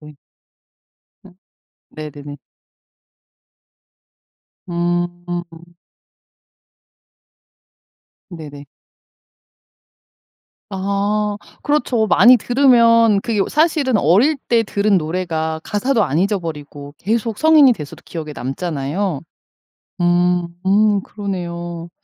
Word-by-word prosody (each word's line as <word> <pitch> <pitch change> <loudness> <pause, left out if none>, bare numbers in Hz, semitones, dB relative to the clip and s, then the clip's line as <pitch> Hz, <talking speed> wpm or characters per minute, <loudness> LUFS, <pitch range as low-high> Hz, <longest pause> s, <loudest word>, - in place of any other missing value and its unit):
네. 150 -1 -13 1.1
어 190 - -16 0.6
네네네. 145 -1 -9 2.3
음. 175 0 -4 2.6
네네. 150 -5 -10 2.1
아 200 +2 -1 0.3
그렇죠. 255 -7 0
많이 245 +4 +6
들으면 230 -4 +4
그게 220 -2 -2
어 - - 0
사실은 300 -6 +1
어릴 220 - +3
때 230 -1 +3
들은 205 -1 +1
노래가 160 -1 -2
가사도 225 +3 0
안 150 -3 -1
잊어버리고 155 -7 -4
계속 225 0 -2
성인이 310 -5 +6
돼서도 150 -5 -10
기억에 155 -3 -7
남잖아요. 145 +4 -3 0.8
음 175 0 +2 0.2
음 205 +1 +3
그러네요. 175 -4 -6
185 Hz, 165 characters per minute, -18 LUFS, 165-215 Hz, 2.6 s, 많이